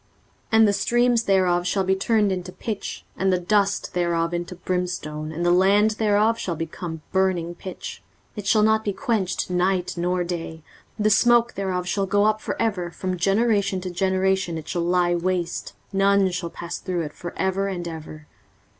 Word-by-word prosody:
23:034:009 - - -38 0.4
And 220 0 +7
the 200 - +2
streams 240 +2 +2
thereof 180 -2 +2
shall 195 +1 +1
be 190 +1 +2
turned 210 +1 +2
into 180 -1 -4
pitch, 210 +2 -5
and 190 0 +1
the 185 - +3
dust 200 +2 0
thereof 170 -1 0
into 175 +1 -4
brimstone, 175 -4 -3
and 170 +2 -3
the 175 - +4
land 200 +4 +4
thereof 215 +1 +2
shall 175 - -2
become 165 0 -6
burning 185 -3 +1
pitch. 185 +1 -8 0.3
23:034:010 - - -28
It 205 -1 -5
shall 215 +1 +4
not 220 0 +3
be 205 - -1
quenched 200 -7 -1
night 180 0 +1
nor 180 +1 0
day; 165 -2 -5 0.3
the 215 0 +2
smoke 240 +2 +4
thereof 185 -2 -2
shall 195 +1 0
go 205 +2 +3
up 215 0 +2
for - - -4
ever: 195 -6 0
from 185 +2 -3
generation 200 +1 +1
to 185 0 -5
generation 190 -1 0
it 160 - -8
shall 175 - -2
lie 175 0 +2
waste; 175 0 -2 0.2
none 195 -1 +3
shall 175 -1 -3
pass 170 +1 -6
through 180 -3 -2
it 150 - -6
for 175 - -8
ever 190 +1 0
and 175 -3 -4
ever. 155 -2 -8
185 Hz, 185 wpm, -23 LUFS, 175-200 Hz, 0.4 s, And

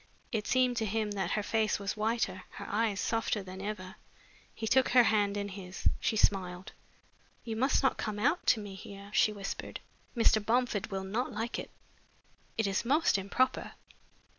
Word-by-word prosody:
It 215 -4 -2
seemed 250 -1 +3
to 225 - +1
him 215 +1 -1
that 200 -1 -1
her 210 - 0
face 220 0 +1
was 200 -1 -3
whiter, 215 -4 -1
her - - -7
eyes 210 -1 0
softer 225 -2 0
than 190 0 -8
ever. 195 -1 -5 0.5
He 225 - -5
took 260 +3 +4
her 245 0 +7
hand 205 -2 +2
in 205 0 -2
his. 190 -1 -4
She 220 - 0
smiled. 185 -3 +1 0.7
"You 225 -2 -4
must 265 +5 +2
not 265 - +3
come 215 -1 -3
out 285 +11 +2
to 225 - +5
me 205 -2 -7
here," 200 +1 -10
she 215 - +4
whispered. 200 -2 -5 0.4
"Mr. 220 -2 +4
Bomford 235 -2 +1
will 195 -1 -3
not 220 +7 -2
like 225 +2 -3
it. - - -6 0.9
It 220 - +2
is 195 0 0
most 295 +7 +3
improper." 235 +7 0
215 Hz, 175 wpm, -31 LUFS, 195-230 Hz, 0.9 s, her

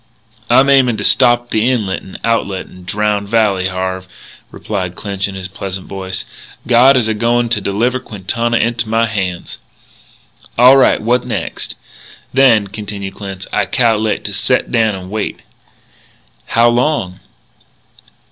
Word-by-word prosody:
"I'm 135 +1 +5
aimin' 130 -5 +4
to 100 - -3
stop 120 0 +3
the 110 +3 +2
inlet 105 -7 -1
and 95 - -11
outlet 100 -5 -1
to - - -18
Drowned 100 +2 -2
Valley, 100 -5 +2
Harve," 95 0 -4 0.4
replied 95 -4 -4
Clinch 100 -1 -3
in 100 - -8
his 95 -1 -5
pleasant 95 0 -6
voice. 95 -1 -5 0.4
"God 125 +3 +5
is 120 -3 +1
a 110 - 0
goin' 120 +2 +1
to 120 - +1
deliver 120 +6 0
Quintana 115 +3 -2
into 115 -1 0
my 115 +1 +2
hands." 95 -5 -4 1.0
"All 125 +3 +8
right. 135 - +4
What 120 +3 0
next?" - - -4 0.6
"Then," 125 -6 +5
continued 100 -1 -6
Clinch, 95 -2 -7
"I - - +1
cal'late 110 -3 +1
to - - -3
set - - 0
down 110 -4 +2
and 95 0 -9
wait." 110 -1 -3 1.1
"How 115 +1 +3
long?" 120 -7 0
110 Hz, 145 wpm, -15 LUFS, 95-120 Hz, 1.1 s, All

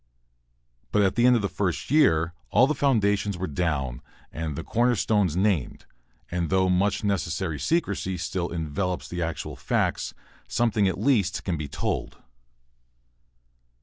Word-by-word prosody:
But 105 - +3
at 95 - +2
the 120 +1 +4
end 125 - +6
of 115 - 0
the - - +2
first 90 +3 -2
year 85 - +4 0.2
all 125 - +5
the 150 - +1
foundations 105 -8 +1
were 95 - -2
down 70 -7 -2 0.3
and 80 -2 -4
the - - -5
corner 120 +1 +2
stones 100 -6 +1
named, 95 -8 0 0.5
and 85 -2 -1
though 95 -1 +2
much 100 +3 +1
necessary 85 -5 -1
secrecy 100 - -1
still 90 -2 -2
envelops 85 +3 -3
the 90 0 -4
actual 85 -2 -3
facts, - - -1 0.3
something 115 -4 +2
at 95 - -1
least 105 -10 +1
can 90 - -1
be 75 -2 -4
told. 70 - -3
95 Hz, 150 wpm, -26 LUFS, 85-105 Hz, 0.5 s, end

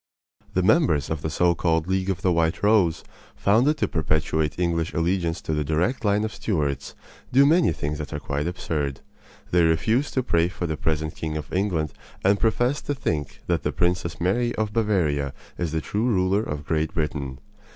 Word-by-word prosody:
The 90 - +2
members 90 - +3
of 80 -2 -2
the 80 - -2
so 85 +3 +3
called 80 -1 +1
League 95 +1 0
of 95 -1 -2
the 90 - +3
White 85 +1 +1
Rose, 100 -7 +3 0.3
founded 125 +10 +3
to - - +1
perpetuate 80 -1 0
English 85 -2 -1
allegiance 85 0 0
to 80 - -3
the 75 0 0
direct 85 - 0
line 105 0 +2
of 110 - -3
Stuarts, 70 - -2 0.4
do 135 +3 +6
many 165 +4 +4
things 75 +1 -3
that 75 - -5
are 75 - -3
quite 70 +2 -2
absurd. 75 -5 -3 0.5
They 90 - +4
refuse 110 - +2
to 130 - +1
pray 85 -8 +2
for 90 0 -5
the 80 -2 -1
present 80 -1 -1
King 80 -1 -3
of 75 -3 -7
England 85 -7 0 0.3
and 100 +1 +4
profess 120 +6 +1
to 145 - -2
think 75 - -3
that - - 0
the - - -1
Princess 90 -1 -1
Mary 120 +7 +1
of 110 -1 -2
Bavaria 85 - +1 0.2
is 85 -3 -1
the 80 0 -1
true 105 +9 -1
ruler 95 -2 +2
of 75 -8 -5
Great 80 0 -1
Britain. 75 -4 -2
85 Hz, 190 wpm, -24 LUFS, 75-105 Hz, 0.5 s, do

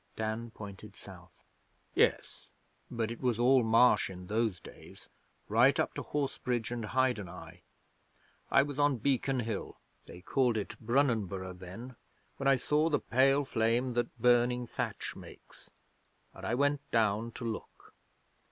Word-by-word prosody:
Dan 110 +2 -3
pointed 105 -1 -10
south. 90 -3 -14 0.5
'Yes; - - +1 0.4
but 115 -1 -2
it 115 - -7
was 125 -4 +1
all 125 +2 +5
marsh 115 -1 +4
in 90 -1 -9
those 110 -2 -1
days, - - -14 0.4
right - - +4
up - - 0
to - - -4
Horsebridge 125 -5 -2
and 120 -2 -3
Hydeneye. 90 -9 -2 0.9
I 140 - +5
was 145 0 -6
on 145 -2 +3
Beacon 135 +1 0
Hill 110 -3 -5 0.3
they 90 - -11
called 125 +2 +1
it 105 - -4
Brunanburgh 110 -7 0
then 110 +7 -9 0.4
when 135 - -2
I 135 - +6
saw 150 +5 +1
the 150 - +2
pale 135 +3 +3
flame 120 +1 0
that 120 0 -2
burning 125 0 +3
thatch - - -4
makes, - - -14 0.6
and - - -7
I 120 - 0
went 145 +2 +1
down 110 0 +1
to 120 - -7
look. 115 -1 -7
115 Hz, 145 wpm, -31 LUFS, 105-130 Hz, 0.9 s, I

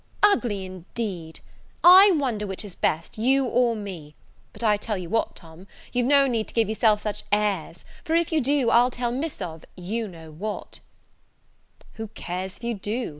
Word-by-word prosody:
"Ugly, 240 - +3
indeed! 185 -2 -6 0.4
I 375 +3 +10
wonder 240 -8 -1
which 195 +2 -5
is 200 - -9
best, 165 +6 -2
you 265 +4 +3
or 245 -1 +2
me. 180 -8 -8 0.4
But, - - -9
I 210 -2 +4
tell 210 0 -3
you 180 -2 -6
what, 225 - 0
Tom, 165 +2 -14 0.3
you've 245 -1 +1
no 280 0 +5
need 230 -5 -1
to - - -12
give 225 -3 +3
yourself 215 -1 +2
such 210 -1 -3
airs; 200 -6 -1 0.2
for, 320 - 0
if 335 0 +1
you 315 -2 +2
do, 270 -2 +2
I'll 245 +2 +5
tell 245 -1 -2
Miss 270 -3 -3
of 165 -2 -7
you 215 +5 -3
know 165 -4 -12
what 205 +7 -6 0.6
" - - -30
"Who 220 - -4
cares 185 +2 -5
if - - -20
you 235 0 -1
do? 220 +4 -3
215 Hz, 185 wpm, -25 LUFS, 185-245 Hz, 0.6 s, I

